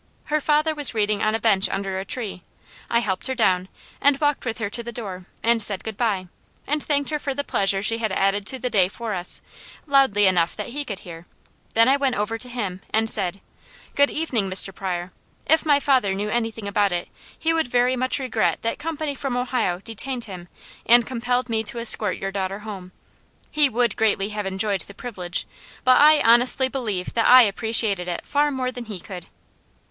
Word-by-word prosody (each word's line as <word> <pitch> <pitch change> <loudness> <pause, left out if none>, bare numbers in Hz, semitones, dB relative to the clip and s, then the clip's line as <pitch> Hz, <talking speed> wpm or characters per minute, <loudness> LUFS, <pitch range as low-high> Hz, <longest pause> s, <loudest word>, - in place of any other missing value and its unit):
Her 305 - +2
father 305 +2 +2
was 290 -5 +5
reading 210 -1 0
on 215 +1 +1
a - - -1
bench 200 -4 +4
under 195 -1 -3
a 190 - -5
tree. 210 -7 -4 0.5
I 235 - +2
helped 190 0 -2
her 260 - -2
down, 185 -6 +1 0.3
and 280 -1 +4
walked 290 -3 0
with 225 -3 -3
her 225 - -2
to 235 +4 -4
the 235 0 -7
door 195 -6 -7 0.2
and 230 0 +3
said 200 -2 0
good 220 -1 -5
bye, 200 -5 -1 0.4
and 300 +1 -1
thanked 285 0 -1
her 300 - -1
for 275 -2 -4
the 285 - -2
pleasure 195 -5 +1
she 225 +2 +1
had 220 -3 -1
added 195 +1 0
to 265 - -3
the 250 -1 -4
day 190 -4 +4
for 225 +1 -5
us, 180 -1 -4 0.4
loudly 270 -8 +3
enough 175 -3 +2
that - - -5
he 290 +4 -4
could 200 -7 -6
hear; 170 -1 -10 0.5
then 230 +1 +5
I 270 +2 +4
went 270 -3 0
over 225 +1 -2
to 250 - -8
him 200 -7 -4
and 220 +1 +1
said: 195 -1 -1 0.5
'Good 285 0 +3
evening, 245 -11 -1
Mr. 190 +1 +2
Pryor. 180 -1 -4 0.3
If 320 +1 +3
my 290 -1 +5
father 260 -9 +2
knew 205 +2 -3
anything 225 -2 -2
about 200 -1 +1
it, 175 0 -3 0.3
he 325 0 0
would 325 -5 0
very 245 +1 +2
much 255 +1 +1
regret 260 -2 -1
that 230 - -2
company 310 -1 -3
from 270 -2 -3
Ohio 245 -8 -1
detained 235 +4 -4
him 185 -5 -8 0.4
and 240 0 +5
compelled 245 +1 -1
me 225 -2 0
to 220 - -5
escort 220 -4 0
your 195 - -4
daughter 195 0 -3
home. 190 -4 -8 0.6
He 295 -2 +3
would 240 -2 0
greatly 205 -2 +1
have 210 -2 -4
enjoyed 195 0 0
the 200 - -11
privilege, 185 -7 -4 0.4
but 255 +1 +5
I 305 +1 +6
honestly 250 +3 +5
believe 215 -9 -4
that 230 - +2
I 255 0 +9
appreciated 210 -3 +2
it 175 - -4
far 295 +1 +1
more 260 -2 -2
than 245 -1 -8
he 210 -4 -6
could.'" 180 0 -9
225 Hz, 205 wpm, -23 LUFS, 195-255 Hz, 0.6 s, I